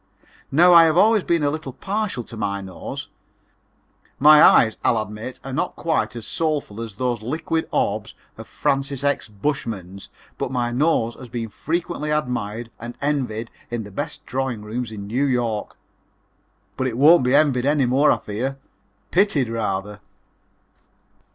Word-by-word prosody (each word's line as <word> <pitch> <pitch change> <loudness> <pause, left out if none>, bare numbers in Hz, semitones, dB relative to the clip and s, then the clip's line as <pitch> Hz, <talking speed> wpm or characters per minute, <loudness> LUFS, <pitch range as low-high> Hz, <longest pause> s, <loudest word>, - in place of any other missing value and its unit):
Now 175 +6 +6
I 165 -1 +9
have 160 0 +2
always 215 +1 +5
been 170 -3 +1
a 145 - +2
little 155 -4 -5
partial 200 - -3
to 115 - -10
my 100 -2 -2
nose. 95 -2 -7 1.1
My 150 +1 +8
eyes, 110 -2 +6
I'll 115 - +3
admit, 110 +4 -6
are 135 - -6
not - - -2
quite 160 -6 -1
as 115 - -6
soulful 150 -9 -2
as 115 -4 -7
those 120 0 -1
liquid 160 +7 -2
orbs - - -1 0.2
of - - -10
Francis 140 0 -1
X. 140 -5 0
Bushman's, 105 -4 -4 0.3
but - - -2
my 120 -2 -1
nose 120 -3 +1
has 125 0 -12
been 115 -1 -4
frequently 160 +3 -3
admired 120 -6 -2
and 120 +1 -8
envied 130 -6 -2 0.2
in 120 -1 -3
the 100 - -11
best - - -5
drawing 130 -4 -3
rooms 115 +2 -4
in 100 -2 -7
New 125 +7 0
York. 120 -5 -1 1.0
But 130 - 0
it 120 -2 -4
won't 150 +2 +6
be 125 +2 +3
envied 140 -4 +3
any 145 -2 +3
more, 135 +4 +4
I - - +2
fear 125 +6 -4 0.5
pitied 170 - +2
rather. 105 -2 -3
125 Hz, 155 wpm, -22 LUFS, 110-150 Hz, 1.1 s, I